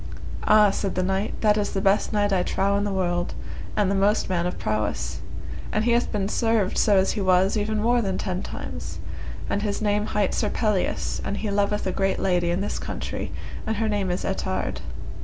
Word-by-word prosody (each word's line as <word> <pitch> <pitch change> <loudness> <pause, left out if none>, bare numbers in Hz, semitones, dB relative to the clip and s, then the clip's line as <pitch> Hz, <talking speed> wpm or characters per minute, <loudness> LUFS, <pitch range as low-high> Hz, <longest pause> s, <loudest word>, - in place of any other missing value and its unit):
Ah, 210 -1 +7
said 195 0 -2
the 185 - +1
knight, 190 +3 -1
that 210 -1 +4
is 205 -1 -1
the 195 - 0
best 195 +1 +2
knight 205 -2 +2
I 185 - +3
trow 195 +2 +1
in 200 0 +1
the 205 - -1
world, 175 -2 0 0.4
and 200 -2 +3
the - - +2
most 200 +2 +2
man 175 -1 +1
of 180 - -4
prowess, 105 -1 -2 0.5
and 215 +1 +1
he 240 - +3
hath 240 +1 +2
been 200 -3 0
served 225 -3 +1
so 205 -2 +4
as 190 0 +3
he 210 - -2
was 185 +1 +4
even 215 0 0
more 240 +1 +3
than 195 -3 -1
ten 185 -2 -2
times, - - -6 0.5
and 205 - 0
his 205 -1 -1
name 210 0 +1
hight 205 -3 +1
Sir 210 - +1
Pelleas, 210 -5 0
and 200 - -2
he 210 -1 -2
loveth 205 +1 +1
a 190 - +1
great 195 +1 +1
lady 180 -2 +1
in 175 +2 0
this 205 - -2
country - - -4 0.4
and 220 - +1
her 220 +1 +1
name 205 -3 0
is 180 - -1
Ettard. - - -2
200 Hz, 215 wpm, -25 LUFS, 190-210 Hz, 0.5 s, Ah